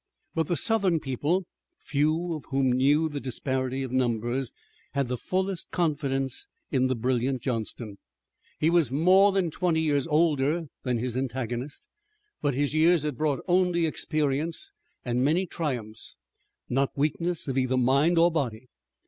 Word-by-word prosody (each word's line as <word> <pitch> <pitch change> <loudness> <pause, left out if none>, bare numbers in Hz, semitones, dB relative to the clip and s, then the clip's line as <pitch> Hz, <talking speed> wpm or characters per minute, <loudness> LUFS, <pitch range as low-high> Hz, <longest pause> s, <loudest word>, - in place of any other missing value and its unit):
But 160 -2 0
the 175 - 0
Southern 200 -6 +3
people, 150 +7 -1 0.3
few 155 +4 0
of 155 -3 -6
whom 135 -1 +1
knew 145 +5 +3
the 145 -2 -4
disparity 130 0 -2
of 130 - -5
numbers, 120 0 0 0.4
had 140 -3 0
the 125 - 0
fullest 185 +6 -2
confidence 140 -5 -1 0.2
in 130 -1 +2
the 130 - 0
brilliant 125 +1 0
Johnston. 115 -4 -4 0.6
He 160 +2 +3
was 165 -8 +3
more 185 +8 +5
than 190 -4 0
twenty 170 0 +1
years 145 -2 +1
older 155 0 +2 0.2
than 125 -2 -1
his 120 +1 -2
antagonist, 130 +1 -3 0.6
but 145 -3 0
his 145 +1 0
years 160 0 +4
had 150 -3 -2
brought 145 +1 -1
only 180 -2 +3
experience 155 0 -1 0.3
and 125 0 0
many 165 +7 +2
triumphs, 125 -11 -3 0.5
not 135 +3 0
weakness 160 +4 -1
of 135 - -2
either 130 -1 +1
mind 140 +7 +3
or 170 +1 +5
body. 125 -6 -3
140 Hz, 150 wpm, -27 LUFS, 130-165 Hz, 0.6 s, more